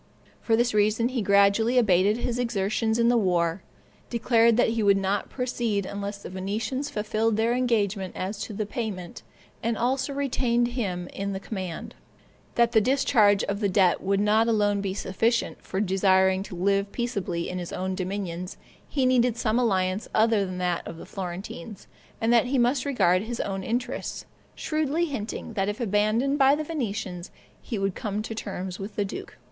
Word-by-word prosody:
For 225 - +2
this 240 +1 +1
reason 215 +3 +2
he 255 -2 -2
gradually 200 +4 +4
abated 205 -2 +4
his 240 0 -2
exertions 220 -1 0
in 235 0 +3
the 240 0 +4
war, 175 -3 +1 0.5
declared 230 -1 +3
he 230 -1 +2
would 200 -1 +4
not 195 +1 -1
proceed 240 -6 -1
unless 200 +1 -5
the - - -6
Venetians 220 +9 -3
fulfilled 215 +1 0
their 225 +2 +2
engagement 210 -6 0
as 195 +3 -4
to 215 - -5
the 210 +1 -2
payment, 205 -6 -5 0.4
and 230 0 -1
also 260 +4 0
retained 245 -4 +1
him 190 -8 -3
in 200 0 -4
the 190 - -3
command; 190 -5 -6 0.6
that 235 -1 +3
the 220 - +5
discharge 215 -5 +3
of 200 0 -2
the 205 -2 +1
debt 185 -2 +3
would 195 +1 +1
not 215 +2 +3
alone 205 -3 +2
be 195 -1 -3
sufficient, 225 +5 0
for 190 - -4
desiring 190 -1 +3
to 195 -2 -7
live 200 +2 +1
peaceably 200 -8 -2
in 180 - -4
his 175 - -6
own 185 +1 -2
dominions, 185 -1 -4 0.3
he 270 -3 +1
needed 250 -2 +3
some 230 0 +1
alliance 190 -4 0
other 215 -3 +3
than 185 0 -5
that 180 -1 0
of 165 - -7
the - - -9
Florentines, 190 +1 -7 0.3
and 225 +1 +2
that 235 0 +5
he 270 +2 0
must 250 +2 +2
regard 185 -10 +3
his 230 +2 -5
own 195 -1 -3
interests, 245 +5 -3 0.3
shrewdly 310 +2 0
hinting 235 -5 -5
that 195 -1 0
if 205 - -4
abandoned 225 +6 +1
by 270 +1 +6
the 310 - -3
Venetians, 210 - -4 0.3
he 230 - -4
would 195 -1 0
come 210 -1 -3
to 225 - -5
terms 190 -4 -5
with 200 +2 -7
the 205 - 0
duke. 195 - -8
210 Hz, 175 wpm, -26 LUFS, 195-235 Hz, 0.6 s, by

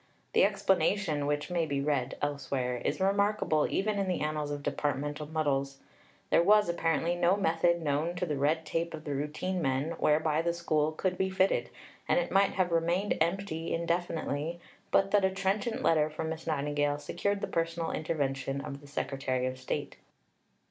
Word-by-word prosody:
The 470 - +5
explanation, 165 -5 +1
which 145 +4 -1
may 170 -2 +1
be 140 -2 -1
read 140 -3 -1
elsewhere, 130 -3 -1
is - - -2
remarkable 200 -5 +2
even 205 +1 0
in 195 - 0
the 180 - -1
annals 150 -1 -1
of 145 -1 -4
departmental 145 +1 -2
muddles. 140 -3 -1 0.5
There - - +6
was, 210 +3 +5
apparently, 170 0 +1
no 175 +2 +3
method 170 -2 +2
known 150 +4 0
to 180 0 -1
the 150 -4 -2
red 155 +4 +1
tape 165 +1 -2
of 155 - -10
the 145 - -3
routine 150 +6 -2
men 135 +2 0
whereby 155 +1 +2
the 170 0 0
School 155 -3 +1
could 180 +3 -2
be 190 0 +1
fitted, 190 +1 +1 0.4
and - - +4
it - - -2
might 195 0 +3
have 185 -2 +1
remained 170 +4 +1
empty 165 -1 -1
indefinitely, 170 -2 -2 0.3
but 195 0 +3
that 205 -1 +4
a 190 - +4
trenchant 195 +4 -1
letter 155 -2 +3
from 160 +1 -4
Miss 160 0 -6
Nightingale 145 -1 0
secured 200 +6 -2
the - - 0
personal 165 0 -1
intervention 135 -3 -2
of 140 0 -7
the 145 - -14
Secretary 135 -3 -2
of 130 0 -3
State. 130 - -4
160 Hz, 175 wpm, -30 LUFS, 145-180 Hz, 0.5 s, There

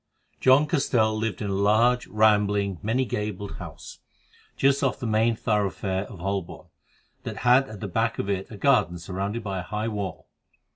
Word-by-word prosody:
John 130 +3 +5
Castell 120 -8 +1
lived 110 -3 -2
in 100 - -2
a - - -1
large, 110 +5 +3
rambling, 105 -3 +2
many 120 +5 0
gabled, 105 -3 -4
house, - - -10 0.6
just 140 +1 +3
off 135 - 0
the - - -4
main 110 +1 +2
thoroughfare 100 -3 -1
of 100 - -11
Holborn, 95 0 -4 0.5
that - - -6
had 130 +2 +5
at 110 -1 -9
the 105 - -3
back 115 +5 0
of - - -3
it 95 -1 -2
a 105 - -9
garden 125 -9 +2
surrounded 100 +6 -4
by 100 -3 -3
a - - -3
high 105 +5 -3
wall. 100 -5 -5
105 Hz, 175 wpm, -25 LUFS, 100-115 Hz, 0.6 s, John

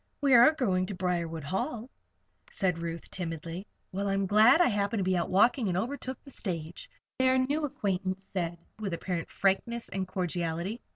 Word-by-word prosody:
"We 280 -2 +3
are 240 +4 +9
going 185 -10 0
to 200 - -4
Briarwood 170 -3 -2
Hall," 225 - -3 0.6
said 180 -4 0
Ruth, 170 0 -5
timidly. 170 +2 -5 0.2
"Well, 200 +2 -2
I'm 195 0 +1
glad 215 - +6
I 350 - +6
happened 205 0 0
to 195 - +1
be 185 0 +1
out 175 - 0
walking 230 +5 +4
and 180 -1 0
overtook 255 +4 -3
the 275 - -12
stage," 170 -8 -5 0.3
their 260 0 +4
new 285 +4 +1
acquaintance 195 -8 -2
said, 170 -3 -2 0.2
with 195 -5 -2
apparent 170 -1 -3
frankness 230 +5 0
and 190 0 -3
cordiality. 180 +3 -2
190 Hz, 170 wpm, -29 LUFS, 175-235 Hz, 0.6 s, are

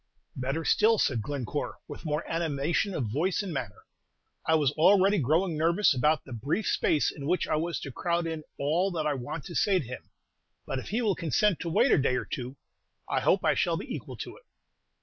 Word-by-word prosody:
"Better 135 +5 -2
still," 225 +1 +4
said 125 - +1
Glencore, 140 +3 -4
with - - -9
more 150 +1 -2
animation 165 +4 0
of 120 -8 -2
voice 175 - 0
and 185 -4 -5
manner. 120 -7 -5 0.6
"I 160 - +3
was 145 -4 +3
already 195 +5 +4
growing 160 +5 +1
nervous 170 +4 +3
about 150 +5 +1
the 130 - -9
brief 140 - -2
space 150 - +2
in 140 -2 -7
which 180 +1 +1
I - - +1
was 170 +2 -2
to 135 - -6
crowd 170 +5 -1
in 160 -2 -4
all 165 +7 +1
that 160 -3 -2
I 150 - +1
want 135 +3 -5
to 175 - -7
say 195 +2 +3
to 160 - -2
him; 125 +2 -9 0.6
but 135 - -3
if - - -8
he 230 +4 0
will 210 -3 +2
consent 185 +3 +1
to 170 - -3
wait 165 - +3
a - - +5
day 130 -2 +2
or - - -2
two, 125 +1 -5 0.5
I - - +1
hope - - +2
I - - +4
shall - - +1
be - - -6
equal - - -7
to - - -7
it." - - -20
160 Hz, 215 wpm, -28 LUFS, 140-175 Hz, 0.6 s, a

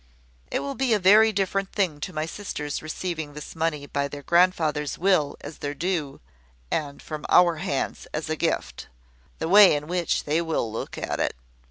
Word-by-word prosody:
It - - -1
will 280 - -4
be 260 -4 +2
a - - 0
very 210 +4 +6
different 195 -1 -1
thing 180 -8 0
to 185 - -5
my 155 -2 -2
sisters 155 -5 -5
receiving 155 -1 -4
this 150 - -8
money 160 -3 -1
by 140 0 -2
their 145 0 -9
grandfather's 160 -4 +2
will 180 -5 +2
as 155 - -9
their 145 0 -4
due, 160 -3 -2 0.5
and 145 -2 -2
from 155 -1 -7
our 175 -2 +5
hands 155 -5 -3
as 155 +1 -3
a 155 - -1
gift 165 +1 -2 0.5
(the 160 - -3
way 195 -2 +8
in 145 0 -3
which 175 0 -1
they 155 +3 +1
will 160 -9 -1
look 115 - -5
at - - -3
it). - - 0
160 Hz, 185 wpm, -25 LUFS, 150-185 Hz, 0.5 s, way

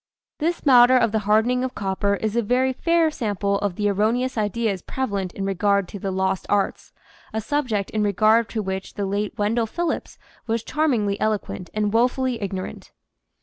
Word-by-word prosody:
This 335 +2 -1
matter 255 -1 +7
of 230 -3 +2
the 220 - +1
hardening 240 +4 +3
of 260 0 -4
copper 200 0 0
is 215 +2 -3
a 235 - +3
very 255 +4 +1
fair 335 +3 +2
sample 200 -6 -1
of 200 -3 -2
the 205 +1 0
erroneous 225 +6 +1
ideas 210 -2 -1
prevalent 200 -8 -3
in 195 - -4
regard 200 0 +1
to 200 - -7
the 195 - -3
"Lost 190 0 -1
Arts," 200 -1 0 0.4
a 220 - -1
subject 225 -5 -1
in 215 - -1
regard 215 +3 +3
to 220 -2 -3
which 190 0 -5
the 200 - -2
late 205 +3 -2
Wendell 225 +2 +1
Phillips 340 +7 -3 0.3
was 225 0 -1
charmingly 235 -10 0
eloquent 210 -4 -2
and 210 -1 0
woefully 250 0 +1
ignorant. 190 -2 -6
215 Hz, 175 wpm, -23 LUFS, 200-245 Hz, 0.4 s, matter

